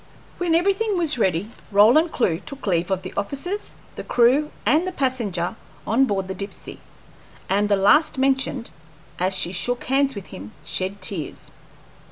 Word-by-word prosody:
When 345 -2 +2
everything 395 +4 +1
was 310 -7 +1
ready, 190 +1 0 0.2
Roland 240 +12 +5
Clewe 170 -9 0
took 275 +7 -9
leave 175 -2 0
of 190 -1 -1
the - - -7
officers, 355 - -3 0.2
the - - -6
crew, 255 +5 +3 0.2
and 305 - +3
the - - -2
passenger 235 - -1 0.3
on 245 +5 +3
board 195 -5 -2
the 190 - -4
Dipsey, 200 +2 -8 0.7
and 205 +2 +1
the 205 - +4
last 295 +11 +4
mentioned, 265 -2 0 0.5
as 185 +1 +1
she 180 -2 +1
shook 245 +7 -1
hands 270 0 +1
with 200 - -7
him, 100 +3 -9
shed 185 +4 -3
tears. 185 -5 -5
230 Hz, 160 wpm, -23 LUFS, 190-285 Hz, 0.7 s, Roland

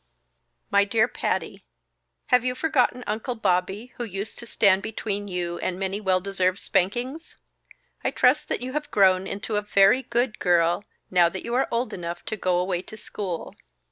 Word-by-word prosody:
"_My 200 0 +4
Dear 220 +1 +3
Patty, - - -2
_ - - -25 0.7
"Have 250 -1 +5
you 250 0 -1
forgotten 255 -4 +1
'Uncle 220 +4 -3
Bobby' 195 +3 -1
who 240 - -3
used 200 -1 -5
to 235 - -9
stand 200 -4 +4
between 205 -1 -3
you 175 -2 -3
and 180 - -2
many 195 +2 -2
well 190 -2 +2
deserved 185 -1 0
spankings? 240 - -1 0.7
I - - +2
trust 300 +4 +2
that - - -1
you 255 +1 -5
have 300 0 -3
grown 190 -1 +4
into 205 +2 -3
a - - +1
VERY 205 +4 +4
GOOD 240 -2 -1
GIRL 175 +1 +2 0.3
now 175 -2 +5
that 190 +2 -7
you 235 - -3
are 260 +2 +2
old 240 +2 -1
enough 175 -1 -6
to 215 - -3
go 185 -4 +1
away 180 0 0
to 220 - -11
school! 195 -5 -5
200 Hz, 180 wpm, -25 LUFS, 185-240 Hz, 0.7 s, Have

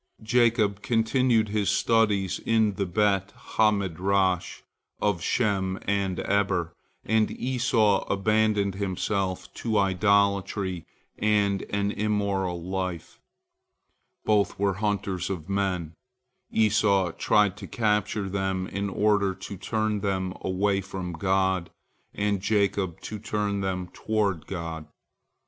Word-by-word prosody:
Jacob 110 -3 +2
continued 115 0 +2
his 105 -1 0
studies 105 -5 +2
in 110 -2 +2
the 95 0 -2
Bet 100 +1 +1
ha 110 -1 +2
Midrash 95 -1 0 0.4
of 100 -5 0
Shem 95 -3 0
and 100 -2 -1
Eber, 95 -4 0 0.3
and 110 -1 +2
Esau 115 -5 +1
abandoned 105 0 +2
himself 95 0 -2
to 110 -2 -1
idolatry 100 -2 +1 0.3
and 105 -2 +2
an 100 0 0
immoral 100 -4 -1
life. 95 -2 -4 1.1
Both 105 -2 +2
were 100 0 +1
hunters 95 -2 -2
of 90 -4 -4
men, 95 -5 -1 0.6
Esau 100 -4 +2
tried 105 +3 +2
to - - -8
capture 105 -2 0
them 95 -1 -1
in 100 +1 -3
order 100 -1 +2
to 95 +1 -8
turn 110 +2 -1
them 95 -2 -1
away 95 +1 0
from 95 -2 -6
God, 95 +1 +1 0.5
and 100 -1 0
Jacob, 100 -4 0
to 105 - -6
turn 105 -2 -2
them 90 -2 -2
toward 100 -7 -1
God. 85 -4 -5
100 Hz, 115 wpm, -26 LUFS, 95-105 Hz, 1.1 s, Jacob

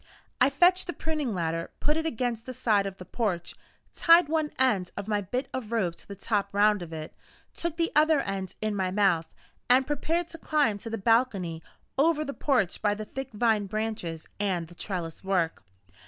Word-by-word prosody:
I 255 - +6
fetched 355 +7 +4
the 350 - -3
pruning 305 -10 -2
ladder; 165 -1 -2
put 300 - +1
it 320 0 -1
against 240 -4 -2
the 255 - -6
side 215 -5 +2
of 195 -1 -7
the 185 - -10
porch; 180 -5 -2 0.4
tied 335 -2 +6
one 315 -1 +1
end 210 -9 +2
of 200 0 -4
my 210 -1 +1
bit 250 +8 -3
of 240 -4 -5
rope 195 -7 +1
to - - -13
the 200 - -7
top 200 0 -1
round 205 -1 +4
of 170 -2 -7
it; 155 -1 -6 0.4
took 340 -1 -3
the 335 -1 +1
other 310 0 +5
end 195 -5 -4
in 215 -1 0
my 190 -2 0
mouth, 185 -5 +2 0.4
and 255 +2 +6
prepared 325 +4 -1
to 330 - -9
climb 290 -12 +1
to 225 - -7
the 225 - -3
balcony 200 -7 +1 0.4
over 305 +1 +3
the 280 - -4
porch 255 - 0
by 205 -1 +2
the 215 +1 -6
thick 270 +4 -6
vine 215 -2 +1
branches 215 -6 -3
and 180 -5 -1
the - - -13
trellis 170 -4 -5
work. 180 -4 0
215 Hz, 200 wpm, -28 LUFS, 190-275 Hz, 0.4 s, I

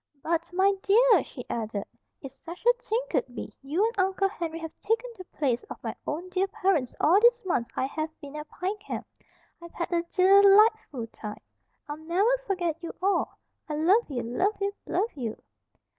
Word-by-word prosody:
"But, 335 +1 -1
my 380 +2 +3
dear!" 435 -1 +5
she 250 - -10
added, 215 -3 -3 0.4
"if 270 - -7
such 340 - -11
a 485 - +7
thing 460 +1 0
could 245 - -1
be, - - -6
you 310 +10 +1
and 455 -3 -2
Uncle 385 +1 +2
Henry 335 -5 -4
have 325 -1 -7
taken 455 +2 -1
the 370 - -10
place 265 -8 -1
of - - -6
my - - -4
own 335 +5 -3
dear 380 +1 0
parents 355 -10 0
all 345 +6 +5
these 475 0 +4
months 245 -10 0
I - - 0
have 310 +3 -3
been 285 0 -10
at 300 0 -7
Pine 380 +4 -3
Camp. 420 - -6 0.6
I've 340 0 -11
had 345 - -3
a 340 -1 +2
dee 355 +2 -1 0.2
lightful 405 - +5
time. 210 -2 -9 0.5
I'll 295 0 -5
never 360 +10 +2
forget 350 -4 -1
you 335 - -6
all. 390 +2 0 0.3
I 300 - -2
love 365 +9 +3
you, 245 -4 -3
love 365 - 0
you, 400 0 -1
love 400 +6 0
you." 235 -6 -5
350 Hz, 190 wpm, -27 LUFS, 300-400 Hz, 0.6 s, a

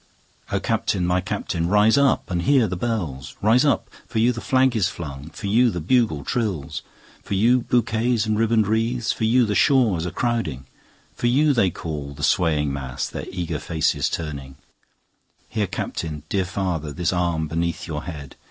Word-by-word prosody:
O - - +1
Captain! 90 -3 0
my 90 +1 +1
Captain! 85 -2 -2
rise 105 +4 +4
up 140 -7 +2
and 85 -1 0
hear 130 +5 +4
the 90 - -3
bells; 90 - -3
Rise 115 +5 +4
up—for 140 -4 -2
you 115 +3 +4
the 115 -1 -5
flag 130 -1 +2
is 100 -5 +2
flung—for 75 +1 -8
you 120 +5 +4
the 90 - -3
bugle 95 - +1
trills, 100 - -2 0.4
10 - - -32
For - - -6
you 120 +6 +4
bouquets 115 -1 +1
and 110 0 0
ribbon'd 110 0 +2
wreaths—for 115 +2 0
you 120 +2 +4
the 105 - -1
shores 100 - +3
crowding, 115 - -1 0.5
For 120 - -1
you 145 +5 +4
they 115 -7 +3
call, 75 -4 -6
the 75 - -8
swaying 75 -9 +2
mass, 65 -3 -4
their - - -6
eager 85 -4 -3
faces 80 -1 0
turning; 70 -5 -5 0.9
Here, 105 -3 -1
Captain! 75 -3 -4
dear 95 -2 0
father! 90 -5 -2
This 85 +4 -1
arm 85 -3 0
beneath 85 +1 -2
your 80 -3 -5
head! 75 -5 -8
95 Hz, 170 wpm, -23 LUFS, 80-115 Hz, 0.9 s, rise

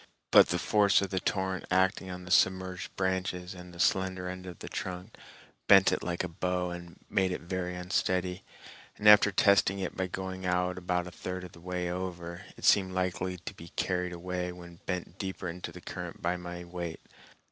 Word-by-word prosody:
But - - +8
the 90 - +1
force 100 +1 +4
of 95 - -3
the 95 - +1
torrent, 95 0 -1
acting 95 0 +2
on 90 0 -7
the 90 - -7
submerged 95 -2 +2
branches 95 -1 -1
and 90 -1 -10
the 85 - -13
slender 95 -1 +1
end 90 0 -6
of 90 -3 -8
the - - -8
trunk, 90 +3 -5 0.5
bent 95 -1 +8
it - - 0
like 90 0 -2
a - - -1
bow 90 +1 -1
and 85 -1 -8
made 95 -1 +1
it - - -3
very 90 +1 -3
unsteady, 90 0 -1 0.5
and 105 - 0
after 105 0 +9
testing 100 0 +4
it 95 -2 -3
by 95 -1 -1
going 95 +1 -5
out 90 0 0
about 90 -1 0
a 90 - -8
third 90 +2 -5
of 90 - -9
the 85 - -15
way 90 0 -2
over, 85 -1 -5
it - - -6
seemed 95 -2 +5
likely 90 0 -1
to - - -4
be 85 - -11
carried 90 -1 0
away 90 +1 -3
when 85 -1 -11
bent 90 0 -4
deeper 95 -2 -4
into 90 +1 -5
the - - -11
current - - -6
by 85 +1 0
my 90 0 -6
weight. 85 -2 -6
90 Hz, 200 wpm, -30 LUFS, 90-95 Hz, 0.5 s, after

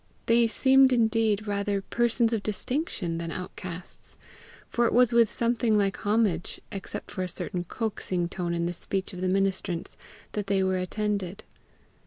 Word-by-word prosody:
They 230 0 +4
seemed 265 +4 +5
indeed 225 -3 +2
rather 200 -1 -1
persons 235 +1 +1
of 220 - 0
distinction 215 - -2
than 165 0 -4
outcasts; 180 0 -8 0.5
for 235 0 +2
it - - -1
was 245 0 +5
with 235 -2 +5
something 235 -1 +1
like 200 -1 +1
homage, 205 -6 +1
except 195 - -6
for 185 - -4
a 185 - -1
certain 180 0 -3
coaxing 185 -4 -2
tone 175 -1 -3
in 170 0 0
the 175 - -1
speech 190 +3 -3
of 180 - -7
the 185 - +1
ministrants, 190 -2 -1 0.3
that 205 -2 -3
they 195 -1 +2
were 190 0 +1
attended. 200 +1 -2
200 Hz, 160 wpm, -27 LUFS, 185-230 Hz, 0.5 s, seemed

